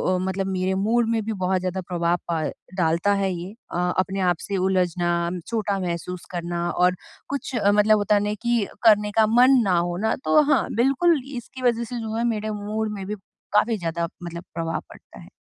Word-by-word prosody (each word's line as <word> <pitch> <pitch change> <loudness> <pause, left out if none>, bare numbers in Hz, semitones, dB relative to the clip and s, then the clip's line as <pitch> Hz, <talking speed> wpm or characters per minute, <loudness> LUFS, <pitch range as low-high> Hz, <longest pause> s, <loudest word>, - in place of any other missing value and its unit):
अ, - - +1
मतलब 190 0 -2
मेरे 185 0 0
मूड 225 +4 +2
में 230 -1 +1
भी 220 - -2
बहुत 185 -1 0
ज़्यादा 185 +1 -3
प्रभाव 175 -1 +1
प 160 -2 -1 0.2
डालता 170 +2 +2
है 195 -1 0
ये। 175 +2 -6 0.2
अ, - - -3 0.2
अपने 190 +1 0
आप 175 -1 +2
से 200 - -3
उलझना, 175 -2 +1 0.2
छोटा 215 -3 -1
महसूस 180 0 -4
करना 175 -1 -2
और 180 0 +2 0.3
कुछ 275 -2 -4
मतलब 210 +1 +5
होता 205 0 +2
है 205 - +3
ना 210 0 -1
कि 235 -3 +1 0.2
करने 210 -1 +5
का 220 - +6
मन 250 +4 +6
ना 185 -4 +2
होना। 175 +5 0
तो 305 - +5
हाँ, 275 - +3
बिल्कुल 275 +6 +3
इसकी 250 +2 -8
वजह 235 -2 +2
से 240 +1 -5
जो 220 -1 -4
है 230 - 0
मेरे 215 -2 -2
मूड 215 +1 -3
में 195 -2 -6
भी 210 - -3 0.4
काफ़ी 220 +2 +3
ज़्यादा 170 -2 -2 0.2
मतलब 170 0 -6
प्रभाव 165 -1 -2
पड़ता - - -15
है। - - -13
195 Hz, 200 wpm, -24 LUFS, 175-220 Hz, 0.4 s, का